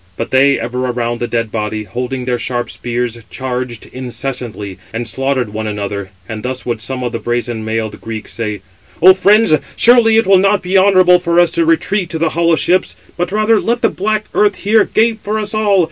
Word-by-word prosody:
But 115 - -4
they, 135 +1 +4
ever 125 +2 -3
around 120 -1 -2
the 120 - -2
dead 115 -2 -2
body, 110 0 -3
holding 125 +5 -4
their 125 -1 -1
sharp 120 -1 -3
spears, 120 -1 -3
charged 125 -3 -4
incessantly, 125 -6 -4
and 115 +1 -4
slaughtered 135 -1 -1
one 110 +1 -4
another, 100 -2 -4 0.2
and 110 -1 -6
thus 130 +1 -5
would 120 -3 -3
some 130 +3 -3
of 120 - -2
the 115 - -4
brazen 120 -1 -2
mailed 110 -1 -3
Greeks 110 -1 -7
say: 105 -4 -4 0.4
"O 185 +3 +8
friends, 205 0 +4 0.2
surely 230 -2 +5
it 225 - +3
will 190 0 +5
not 195 +1 +2
be 180 +2 -2
honourable 185 -2 +5
for 170 -1 +1
us 175 -1 +4
to 335 - +1
retreat 210 - +1
to 165 - -4
the 160 0 +1
hollow 170 0 +2
ships; 180 +3 +1 0.2
but 175 0 -2
[rather] 215 +1 +2
let 235 +1 -1
the - - +4
black 215 +2 -2
earth 205 -2 +2
here 215 +1 +2
gape 225 0 +1
for 210 +2 -2 0.2
all. 210 -3 +2
130 Hz, 200 wpm, -15 LUFS, 115-195 Hz, 0.4 s, O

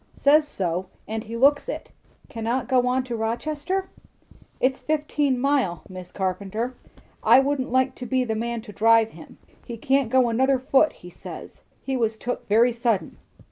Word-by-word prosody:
"Says 295 +2 +4
so. 185 - -2 0.2
And 220 +1 -4
he 230 +1 -6
looks 285 - +3
it." - - -6 0.4
"Cannot 235 -1 -2
go 250 -1 +2
on 255 +1 +1
to 245 -2 -5
Rochester? 295 +12 -2 0.7
"It's 260 +1 +1
fifteen 295 -3 0
mile, 260 - 0
Mis' 185 -2 -10
Carpenter. 200 +6 -3 0.5
I - - +7
wouldn't 270 -1 -1
like 260 +1 +2
to 250 - -6
be 260 +1 +1
the 225 -3 -2
man 230 +1 -3
to 210 -3 -11
drive 225 +1 +4
him. - - -14 0.3
He 235 -2 -7
can't 265 +1 +1
go 255 0 +4
another 260 +4 +2
foot, 265 +4 +3
he 180 - -13
says. - - -10 0.2
He 270 - -2
was 225 -3 0
took 245 +2 -5
quite 230 +4 +4
sudden." 230 -3 -1
245 Hz, 170 wpm, -24 LUFS, 225-270 Hz, 0.7 s, I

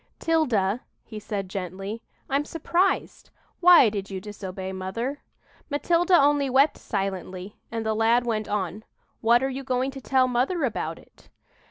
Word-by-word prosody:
"'Tilda," 250 -10 +1 0.2
he 215 -2 -8
said 200 -2 -4
gently, 195 +3 -5 0.3
"I'm 275 +1 +1
surprised. 340 +5 -1 0.3
Why 350 -7 +8
did 200 -2 -5
you 190 -1 -4
disobey 190 -2 -6
mother?" 230 +10 -4 0.5
Matilda 340 +4 +3
only 285 -1 +3
wept 275 +4 +3
silently, 190 -1 -4
and 225 -1 -3
the 220 - +1
lad 230 +3 +3
went 220 -3 -1
on, 205 0 -2 0.4
"What 235 +2 +4
are - - +2
you 270 +1 -5
going 260 +1 -1
to 270 0 -9
tell 260 0 +3
mother 260 +8 0
about 235 -5 -2
it?" - - -21
230 Hz, 150 wpm, -25 LUFS, 200-275 Hz, 0.5 s, Why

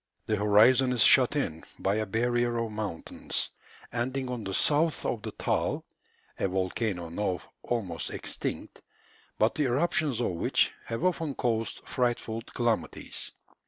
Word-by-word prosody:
The 110 - +1
horizon 115 +5 +5
is 120 -5 +4
shut 130 +2 +6
in 80 - -1
by 95 - +1
a 110 -1 -1
barrier 120 +3 +1
of 115 -1 -1
mountains, 105 -6 -2 0.4
ending 130 +2 -2
on 120 -3 -4
the 95 - -4
south 155 +2 +2
of 115 - -1
the - - -4
Taal, - - -1 0.5
a - - +2
volcano 95 -1 -1
now 90 +1 -1 0.2
almost 95 - -2
extinct, - - -4 0.6
but 110 - +3
the 150 - 0
eruptions 140 -1 +1
of 120 - +1
which 85 - +2
have 115 +7 -4
often 165 -6 0
caused 115 -2 -1
frightful 120 -3 -1
calamities. 120 -1 -2
115 Hz, 140 wpm, -29 LUFS, 105-125 Hz, 0.6 s, shut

